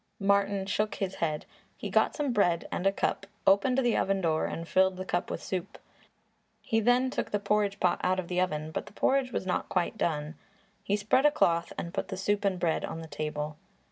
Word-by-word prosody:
Martin 200 -1 +2
shook 210 +2 -1
his 195 -1 -2
head. 155 -2 -1 0.3
He - - -5
got - - +3
some 285 -5 -1
bread 175 -6 +2
and 190 - 0
a - - +5
cup, 195 0 -1 0.2
opened 205 +7 +4
the 245 -3 +2
oven 195 0 +1
door 160 -3 +1
and 165 0 -5
filled 190 0 +3
the 185 - -5
cup 175 -1 -1
with - - -4
soup. 185 0 -4 0.9
He 225 -2 +1
then 245 +3 +3
took - - -2
the 205 - +1
porridge 205 0 0
pot 180 -1 +2
out 185 +1 +2
of 180 - -4
the 180 0 0
oven, 155 -4 -2
but - - -4
the - - -13
porridge 265 +3 +1
was - - -2
not 180 - -1
quite 185 +4 -1
done. 150 -2 -1 0.5
He 200 - +1
spread 220 +7 +3
a - - +6
cloth 170 - +2
and 170 - -5
put - - -2
the 190 - -5
soup 205 +2 0
and 190 -2 +1
bread 165 -2 0
on 165 - -4
the 160 - -8
table. 150 -1 -4
190 Hz, 220 wpm, -29 LUFS, 170-205 Hz, 0.9 s, a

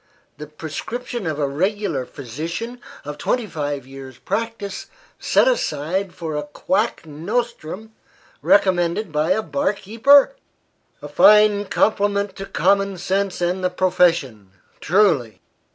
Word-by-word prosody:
The 150 - -7
prescription 190 +9 -6
of 155 -2 -2
a 145 -2 0
regular 190 - -1
physician, 165 - -6 0.2
of 150 0 -7
twenty 245 +7 0
five 145 -7 -4
years' 135 -1 -11
practice, 210 -1 -4 0.3
set - - +3
aside 185 - -1
for 165 -4 -5
a 150 - -1
quack 185 +8 -2
nostrum, 205 +4 -4 0.5
recommended 185 -1 +2
by 155 +2 0
a 205 +4 +2
bar 280 0 0
keeper! 260 - +4 0.7
A - - -5
fine 210 -1 +5
compliment 200 -1 0
to 195 0 -6
common 195 -1 +1
sense 190 +1 -2
and 180 +2 -1
the 180 - +2
profession, 170 - +1 0.3
truly! 160 - +2
185 Hz, 120 wpm, -21 LUFS, 150-210 Hz, 0.7 s, fine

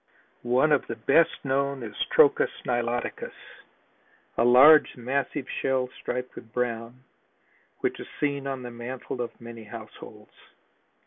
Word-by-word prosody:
One 125 +5 +2
of 145 - +2
the - - -4
best 165 - +4 0.2
known 140 -1 0
is 110 - -7 0.2
Trochus - - +5 0.2
niloticus, 120 0 -2 1.0
a - - +2
large, 135 +6 +7
massive 130 +2 -2 0.2
shell 130 -1 0
striped 125 0 -4
with 115 - -12
brown, 120 +1 -3 0.8
which - - -1
is - - -8
seen 140 -2 -1
on 135 -2 -4
the 120 - -7
mantle 125 +1 -6
of 120 - -6
many 115 -1 -10
households. 110 0 -11
125 Hz, 130 wpm, -26 LUFS, 120-135 Hz, 1.0 s, large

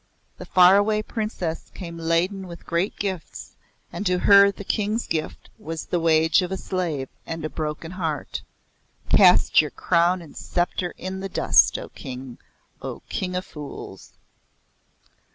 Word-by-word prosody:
The - - -9
Far 185 +1 +7
Away 215 +1 +2
Princess 210 -8 -4
came 170 -3 -7
laden 175 +4 0
with 170 -1 -11
great 170 +4 -1
gifts, 190 -4 -5 0.4
and - - -4
to 180 0 +2
her 200 +1 +7
the 200 - -9
King's 215 +3 -1
gift 160 -1 -4
was 160 0 -6
the 175 - -1
wage 160 0 +4
of 180 0 -4
a 190 - -2
slave 170 -9 -3 0.2
and 165 -1 -4
a 155 - -4
broken 155 +1 -4
heart. 165 -5 -3 0.7
Cast - - +6
your - - -4
crown 175 +2 +2
and 160 - -14
sceptre 175 0 -2
in 190 +1 -5
the 195 0 -5
dust, - - +4
O - - -8
King 130 -1 -9 0.4
O - - -6
King 180 -1 -3
of 180 - -2
Fools." 145 - -10
175 Hz, 150 wpm, -24 LUFS, 160-190 Hz, 0.7 s, Far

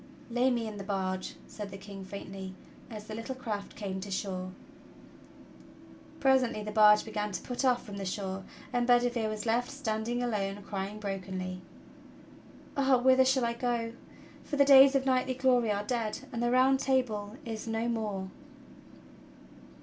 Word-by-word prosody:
"Lay 245 +2 +3
me 240 -2 0
in 215 -1 -6
the 200 - -6
barge," 190 -2 -2
said 210 -2 -7
the 195 - -8
King 195 0 -9
faintly, 190 -1 -7 0.3
as 215 -2 -8
the 215 - -7
little 230 +4 -5
craft 215 -6 -5
came 195 -3 -4
to 200 +2 -7
shore. 185 -1 -3 1.7
Presently 260 -5 +3
the 210 - -5
barge 210 -1 +6
began 210 -1 -3
to 180 - -4
put 245 +1 -3
off 250 -2 +2
from 205 -2 -7
the 200 - -4
shore, 190 0 -3 0.3
and 245 0 +1
'Bedi 245 0 +5
vere 230 -3 -1
was 215 0 -4
left 235 +2 +1
standing 240 -3 -2
alone 205 -4 -2
crying 200 +1 -4
brokenly: 185 -2 -4 1.1
"Ah 270 -2 +4
whither 260 +1 +5
shall 260 -1 +2
I 235 - 0
go, 235 -1 -1 0.5
for 295 - -4
the 280 -1 +5
days 275 0 +8
of 270 - +3
knight^" 255 -1 +1
glory 250 -4 +3
are 205 0 -1
dead, 225 -1 -2
and 235 - -2
the 240 - +2
Round 260 +2 +4
Table 230 -6 0
is 225 -1 -5
no 225 +1 -1
more!" 210 -5 -2
220 Hz, 165 wpm, -30 LUFS, 200-245 Hz, 1.7 s, days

